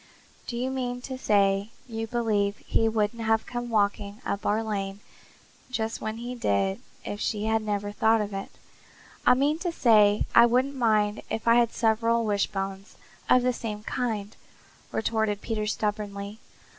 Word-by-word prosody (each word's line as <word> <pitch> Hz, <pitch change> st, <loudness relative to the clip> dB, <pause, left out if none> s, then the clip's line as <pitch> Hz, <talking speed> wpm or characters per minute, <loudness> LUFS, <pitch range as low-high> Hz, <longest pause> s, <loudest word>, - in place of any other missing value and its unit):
Do 235 Hz, -, -4 dB
you 255 Hz, +2 st, -1 dB
mean 250 Hz, -2 st, -2 dB
to 260 Hz, +1 st, -5 dB
say 200 Hz, -4 st, +2 dB, 0.2 s
you 225 Hz, -1 st, -4 dB
believe 215 Hz, -4 st, 0 dB
he 225 Hz, -, +2 dB
wouldn't 220 Hz, +1 st, -1 dB
have 220 Hz, 0 st, +1 dB
come 240 Hz, 0 st, -4 dB
walking 205 Hz, -1 st, 0 dB
up 200 Hz, -, -2 dB
our 215 Hz, +2 st, +1 dB
lane 200 Hz, -2 st, -3 dB, 0.7 s
just 225 Hz, -3 st, -2 dB
when 220 Hz, 0 st, -3 dB
he 240 Hz, +2 st, -5 dB
did 100 Hz, -, 0 dB, 0.2 s
if 205 Hz, -, -4 dB
she 210 Hz, -1 st, -1 dB
had 220 Hz, 0 st, +2 dB
never 205 Hz, -1 st, -2 dB
thought 220 Hz, +2 st, +3 dB
of 210 Hz, -1 st, -3 dB
it?" 195 Hz, 0 st, -4 dB, 0.8 s
"I -, -, +8 dB
mean 290 Hz, +4 st, +1 dB
to 350 Hz, 0 st, -2 dB
say 215 Hz, -8 st, +4 dB
that -, -, +7 dB
I 235 Hz, -, +9 dB
wouldn't 255 Hz, +4 st, +1 dB
mind 215 Hz, -4 st, +2 dB
if 225 Hz, -, -4 dB
I 230 Hz, +1 st, +6 dB
had 235 Hz, -1 st, +3 dB
several 230 Hz, +1 st, +2 dB
wishbones 195 Hz, -1 st, -2 dB, 0.3 s
of 250 Hz, -, +5 dB
the 250 Hz, 0 st, +2 dB
same 210 Hz, -3 st, -5 dB
kind," 220 Hz, -4 st, -3 dB, 0.6 s
retorted 220 Hz, -2 st, 0 dB
Peter 215 Hz, -2 st, -2 dB
stubbornly. 210 Hz, -1 st, -3 dB
220 Hz, 165 wpm, -27 LUFS, 205-235 Hz, 0.8 s, I